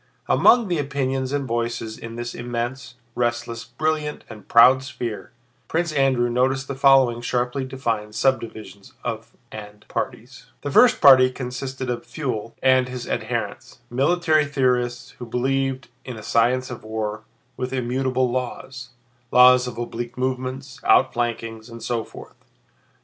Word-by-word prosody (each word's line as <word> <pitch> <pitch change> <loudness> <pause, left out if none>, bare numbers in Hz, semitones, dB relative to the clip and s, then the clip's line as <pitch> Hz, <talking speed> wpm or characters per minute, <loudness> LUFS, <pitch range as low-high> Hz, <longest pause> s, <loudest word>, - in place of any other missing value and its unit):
Among 235 -3 +5
the 175 -4 0
opinions 135 -2 -2
and 140 -2 -2
voices 115 -1 -2
in 115 0 -9
this 120 0 -5
immense, 120 +2 -5 0.2
restless, 120 -1 -2
brilliant, 150 +4 -2
and 105 -3 -12
proud 130 +3 +7
sphere, 120 -4 -6 0.4
Prince 170 0 -1
Andrew 135 -4 +2
noticed 130 +3 0
the - - -3
following 135 -3 +4
sharply 125 +2 -1
defined 115 -5 -3
subdivisions 110 -7 -2
of 115 -1 -5 0.2
tendencies 105 -1 -8
and 105 - -26
parties: - - -5 0.2
The 145 - -4
first 245 - +5
party 130 -2 +8
consisted 130 0 -5
of 120 - -3
Pfuel 120 -7 -4
and 130 -1 +4
his 125 -1 -6
adherents—military 135 - -1
theorists 125 -3 0
who 120 - -6
believed 135 +2 -1 0.2
in 125 -3 -7
a 110 - -9
science 125 +4 +1
of 120 - -8
war 110 -1 -4 0.3
with 125 0 -4
immutable 130 0 0
laws—laws 125 0 +1
of 120 -2 -7
oblique 120 0 -5
movements, 130 +1 -3
outflankings, 115 -1 +1
and 115 -1 -10
so 120 -2 -1
forth. - - -14
125 Hz, 135 wpm, -23 LUFS, 120-130 Hz, 0.4 s, party